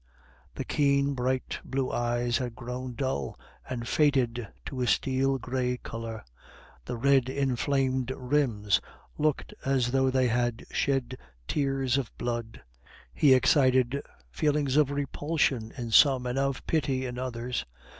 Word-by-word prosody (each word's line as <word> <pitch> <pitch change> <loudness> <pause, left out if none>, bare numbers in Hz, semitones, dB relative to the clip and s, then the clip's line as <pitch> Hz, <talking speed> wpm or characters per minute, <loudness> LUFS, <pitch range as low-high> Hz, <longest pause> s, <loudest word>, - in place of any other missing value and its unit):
The - - -3
keen, 140 -1 +2
bright 130 0 -1
blue 135 -1 -2
eyes 120 0 0
had 120 -3 -4
grown 125 +1 -6
dull, 130 - -2 0.3
and 120 -2 -4
faded 125 -7 +2 0.2
to 130 -2 -4
a 125 - +1
steel 135 +2 +2
gray 125 0 -2
color; 115 -2 -7 0.6
the 125 - -4
red 135 0 +3
inflamed 130 -1 0
rims 125 -7 +1 0.4
looked 150 -1 0
as 130 -3 +1
though 135 0 +3
they 130 -1 +2
had 120 0 0
shed 130 -2 0 0.3
tears 135 -2 +1
of 130 - -4
blood. 120 -2 -4 0.5
He 135 - +6
excited 130 0 +3 0.3
feelings 145 - +1
of 150 -2 +4
repulsion 140 -4 -1
in 120 -3 -4
some, 130 +1 +6
and 125 +2 -1
of 135 -1 -1
pity 135 -5 0
in 125 -1 -5
others. 125 - -3
130 Hz, 135 wpm, -28 LUFS, 120-135 Hz, 0.6 s, He